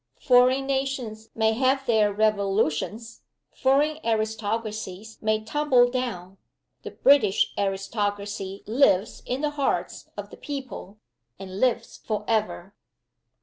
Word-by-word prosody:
foreign 255 +2 +4
nations 265 -5 -3
may 220 0 +2
have 265 +3 +1
their 220 -4 +3
revolutions! 210 +1 0 0.3
foreign 290 +4 +2
aristocracies 220 -2 -3
may 215 0 0
tumble 250 -1 +3
down! 195 -8 -4 0.4
The - - -7
British 265 -9 +3
aristocracy 200 0 -3
lives 220 -4 +2
in 255 +3 -2
the 300 -1 0
hearts 285 -2 -2
of - - -7
the - - -11
people, 265 - -7 0.4
and 190 0 -8
lives 250 0 0
forever! 210 -3 -2
220 Hz, 105 wpm, -25 LUFS, 205-255 Hz, 0.4 s, foreign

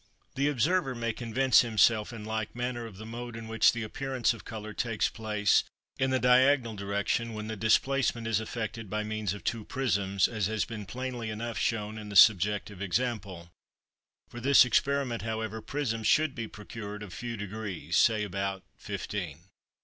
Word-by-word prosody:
The 140 +2 +1
observer 145 +1 +1
may 115 -1 -2
convince 125 +3 +3
himself 110 -1 +3
in 110 -3 -8
like 110 0 -3
manner 120 -1 -3
of 100 -4 -12
the 110 - -9
mode 120 +1 -7
in 115 -1 -7
which 110 0 +4
the 115 -1 -4
appearance 130 +2 -1
of 115 - -11
colour 110 -1 -7
takes 115 -1 0
place 105 -2 +2 0.4
in 130 - +2
the 130 - +2
diagonal 125 -1 +4
direction 100 +3 -1
when 105 0 -5
the 110 0 -4
displacement 115 +2 +2
is 115 -2 +1
effected 110 -1 -5
by 105 +2 -1
means 105 -2 -2
of 105 - -10
two 115 -2 -2
prisms, 100 -7 +1
as 110 -5 -1
has 110 -1 -1
been 105 -4 -7
plainly 125 0 -4
enough 115 +2 -4
shown 110 -3 -1
in 105 -1 -8
the 100 - -7
subjective 105 0 +5
example; 100 -4 -2 0.8
for 120 - -9
this 135 +1 +6
experiment, 130 0 +1
however, 110 0 -3
prisms 115 -6 -2
should 155 -2 +3
be 115 -3 -5
procured 105 -1 -8
of 100 - -9
few 120 -1 -5
degrees, 100 -5 -5
say 110 -2 +4
about 95 -1 -3
fifteen. 90 -3 -6
110 Hz, 170 wpm, -29 LUFS, 105-120 Hz, 0.8 s, this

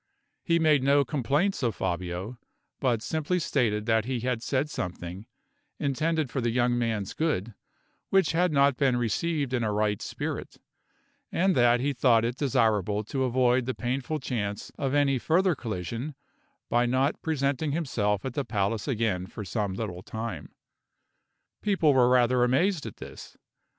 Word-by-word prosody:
He 170 -1 +2
made 155 -4 +4
no 140 +1 +4
complaints 145 - 0
of 115 -5 0
Fabio, 90 +6 -3 0.4
but 120 -4 0
simply 160 +3 -1
stated 115 -10 0
that 110 -1 +2
he 125 -2 -2
had 125 -1 -1
said 130 +3 0
something, 90 - -6 0.5
intended 155 0 0
for 135 - -1
the 120 - +1
young 120 +1 +2
man's 110 -5 -1
good, 120 - -1 0.6
which 195 -5 +3
had 175 +1 +2
not 140 -2 +3
been 135 -4 +2
received 140 +4 -1
in 120 -2 +1
a 110 - 0
right 105 -1 0
spirit; - - -5 0.7
and 190 +1 +2
that 120 0 +4
he 140 +2 0
thought 120 -3 +3
it 120 +1 -2
desirable 110 -7 +1
to 130 +5 -1
avoid 125 0 +2
the 130 - -2
painful 130 +5 -2
chance 105 -6 -4
of 135 0 -1
any 140 -2 +3
further 180 +7 +2
collision 115 - -5 0.5
by 120 +1 +2
not 130 +4 +1
presenting 145 -1 0
himself 120 - -1
at 130 - -3
the 145 - -1
palace 105 -2 -1
again 110 -8 -1
for 105 +2 -7
some 100 -1 -2
little 95 -5 -4
time. 110 -7 -6 1.1
People 185 -8 +3
were 125 -2 +5
rather 125 0 +4
amazed 145 - +1
at 110 - -9
this. - - -11
125 Hz, 155 wpm, -27 LUFS, 110-145 Hz, 1.1 s, were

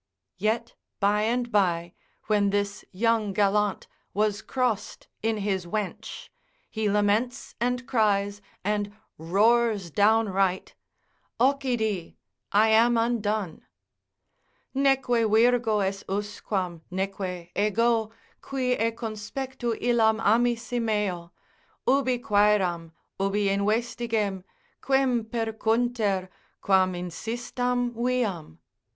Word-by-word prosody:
Yet 225 +3 -1 0.3
by 205 +1 +2
and 240 +1 -1
by 175 -4 +1 0.3
when 205 -2 +2
this 200 0 -1
young 220 0 +1
gallant 205 0 +1 0.3
was 210 0 +1
crossed 245 -5 -2
in 225 0 0
his 195 -3 -2
wench, 205 +1 -5 0.4
he 220 -1 -1
laments, 210 +6 0
and 250 +1 0
cries, 205 -3 +1 0.2
and 205 0 -1 0.3
roars 205 +2 +2
downright: 200 -2 +2 0.7
Occidi—I 220 -5 0
am 230 +2 +5
undone, 215 -5 -1 1.1
Neque 270 0 +2 0.2
virgo 225 -1 +3
est 195 0 -2
usquam, 195 -3 -3
neque 185 -2 -4
ego, 220 +2 +2 0.3
qui 260 -2 -2
e 230 -2 +2
conspectu 235 +2 -4
illam 225 -2 +3
amisi 235 +2 +1
meo, 200 -6 -1 0.6
Ubi 260 -1 +3
quaeram, 205 -8 +2 0.3
ubi 195 +1 +1
investigem, 215 -1 0 0.4
quem 265 -4 +2
percunter, 225 -3 0 0.3
quam 190 -1 +3
insistam 240 +7 -2
viam? 230 - -2
215 Hz, 90 wpm, -26 LUFS, 200-235 Hz, 1.1 s, am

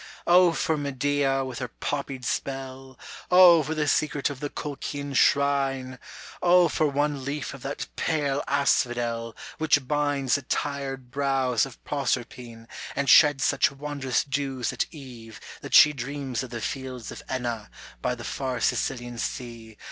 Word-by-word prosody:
O 175 0 +6
for 160 -1 0
Medea 140 -1 0
with 130 -2 -6
her 125 - -3
poppied 135 +1 -5
spell! 135 -1 -4 0.3
O 180 -2 +8
for 155 +2 -3
the 150 -1 0
secret 145 -1 +1
of 135 - -8
the 145 - -4
Colchian 145 -1 -5
shrine! 135 -2 +2 0.4
O 180 0 +5
for 155 - +1
one 145 -1 -1
leaf 140 -1 -4
of 135 - -11
that 135 +3 -4
pale 145 -3 0
asphodel 120 -4 0 0.2
Which 145 -4 +2
binds 145 -3 0
the 140 - +2
tired 135 -2 -3
brows 135 -3 +1
of 130 - -15
Proserpine, 120 -4 -3 0.3
And 140 -2 +2
sheds 145 -4 +6
such - - +3
wondrous 140 -2 -2
dews 135 -3 -2
at - - -1
eve 120 -7 -11 0.2
that - - -1
she 150 - +8
Dreams 135 -1 -4
of 130 - -7
the 120 -1 -6
fields 130 -1 -5
of - - -9
Enna, 120 -4 -3 0.3
by 125 - -1
the 120 - -9
far 125 +4 -3
Sicilian 120 -1 -1
sea. 115 -3 -6
135 Hz, 150 wpm, -26 LUFS, 125-145 Hz, 0.4 s, O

